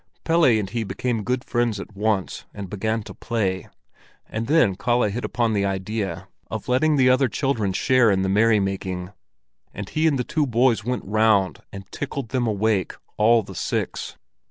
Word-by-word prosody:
Pelle 165 0 +3
and 110 -5 +3
he 115 +3 -3
became 110 +3 -2
good 125 +3 -1
friends 120 -4 0
at 100 +1 -9
once, 105 -2 -1
and 100 -3 -7
began 110 +2 -1
to - - -10
play; 95 -6 -2 0.6
and 115 +1 -4
then 145 -9 +4
Kalle 120 +4 +1
hit 120 +4 -4
upon 120 -2 0
the 100 -1 +1
idea 95 -1 -3 0.2
of - - -5
letting 150 +5 +3
the 130 -2 +4
other 130 +1 +4
children 115 -5 -1
share 125 +4 +3
in 95 -2 +2
the - - 0
merry 105 +3 +4
making, 95 -2 -3 0.6
and 100 -1 -5
he 155 +1 +1
and 145 -3 +2
the 125 - 0
two 150 +3 0
boys 120 -3 +2
went 125 +2 -3
round 105 -2 +2
and 100 0 -9
tickled 140 -4 -5
them 125 -2 0
awake, 105 -3 0 0.2
all 115 +1 +4
the - - -10
six. - - -3
110 Hz, 180 wpm, -23 LUFS, 100-125 Hz, 0.6 s, then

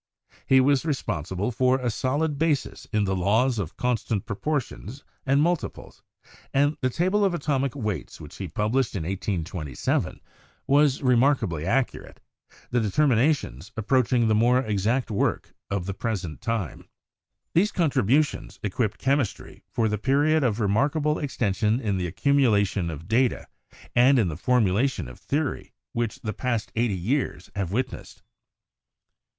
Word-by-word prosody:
He 130 - +6
was 135 0 +4
responsi 105 - -3
ble 105 +6 0
for 130 +2 +2
a 125 -2 -1
solid 145 +6 -1
basis 155 -3 0
in 105 -2 +2
the 95 -1 0
laws 110 +6 +2
of 90 -4 -5
constant 120 -5 -1
proportions 130 +2 -4 0.2
and 140 +2 +4
multiples, 175 0 -3 0.5
and 145 +2 +2
the 130 - +2
table 185 +9 +1
of 190 -3 +2
atomic 140 -4 -1
weights 105 - -4
which 75 - -11
he 95 - -4
published 110 - 0
in 90 - -2
1827 85 - -2 0.5
was 145 -1 +3
remarkably 120 - +2
accurate, 135 +4 -1 0.5
the 120 - +2
determina 130 +6 +3
tions 75 - -10
approaching 120 +1 +2
the 110 - +3
more 120 +4 +4
exact 110 +3 0
work 100 - -1 0.2
of 100 -3 -2
the 100 - -3
present 100 -1 -4
lime. 110 - -3 0.7
These 200 +6 +3
contributions 140 - +1
equipped 105 +1 -1
chemistry 135 -4 -1
for 115 - 0
the 105 -1 -1
period 145 +5 +2
of 115 -3 +1
remarkable 145 +9 +1
extension 110 -4 0
in 105 -6 -1
the 90 - -1
accumulation 105 - +2
of 80 0 -7
data 120 +3 +1 0.5
and 130 +3 +6
in 105 -7 +2
the 75 - -4
formulation 110 - +1
of 60 - -11
theory 145 0 -2 0.2
which 115 -2 -2
the 110 - -3
past 120 0 -2
eighty 115 -4 +1
years 110 -1 -2
have 95 -3 -2
witnessed. 125 +4 -4
120 Hz, 145 wpm, -25 LUFS, 100-135 Hz, 0.7 s, He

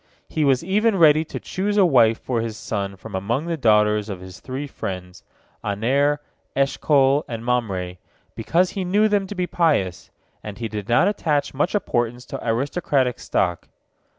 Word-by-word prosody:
He 155 - -1
was 135 -1 +3
even 210 +4 +2
ready 155 -2 +6
to - - -6
choose 205 +2 -2
a 195 - +6
wife 115 -8 +4
for 120 -3 -2
his 110 -2 -4
son 100 -2 -4
from 95 - -11
among 115 - -1
the 170 -1 -1
daughters 105 -5 +3
of 95 -3 -5
his 95 0 -11
three 130 +3 -5
friends, 90 -8 -7 0.4
Aner, 135 +8 +1 0.4
Eshcol, 140 +1 +3
and 115 -1 -6
Mamre, 95 -8 -1 0.4
because 180 +2 +1
he 195 - -3
knew 205 +4 +3
them 205 -2 +1
to 205 - -7
be 180 -1 -1
pious, 150 - 0 0.3
and 105 -1 -7
he 115 - -3
did 105 -1 -6
not 120 +10 +4
attach 155 -8 0
much 150 +9 0
importance 120 - -1
to 135 - -6
aristocratic 130 +1 0
stock. 90 -2 -1
130 Hz, 170 wpm, -22 LUFS, 105-165 Hz, 0.4 s, ready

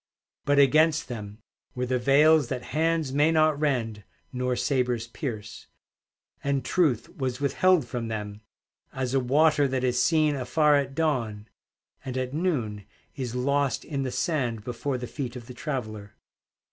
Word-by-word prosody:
But 145 0 +2
against 155 +3 +4
them 105 -2 -7 0.3
were 125 0 -1
the 125 0 0
veils 145 +3 +5
That 125 -1 -4
hands 160 -2 +1
may 150 +3 +3
not 155 -2 +3
rend 115 -8 -1 0.3
nor 125 0 -1
sabers 125 -3 0
pierce; 115 -4 -6 0.8
And 140 -2 -1
Truth 130 -9 0
was 130 -2 -2
withheld 150 +3 +3
from 120 -1 -4
them, 105 -1 -5 0.5
As 130 -1 -3
a 135 - +3
water 145 +3 +3
that 130 -1 -2
is 125 -1 +1
seen 155 0 +3
afar 145 +3 +2
at 135 -1 -1
dawn, 115 -10 -1 0.5
And 130 -2 -5
at 130 0 -3
noon 120 - -2 0.3
is 125 -4 -4
lost 140 +2 0
in 140 -3 -3
the 130 - -2
sand 125 -7 -1
Before 125 +3 -3
the 125 - -5
feet 125 -1 -5
of 120 -2 -8
the 125 - -10
traveller. 110 -7 -5
130 Hz, 155 wpm, -26 LUFS, 120-150 Hz, 0.8 s, veils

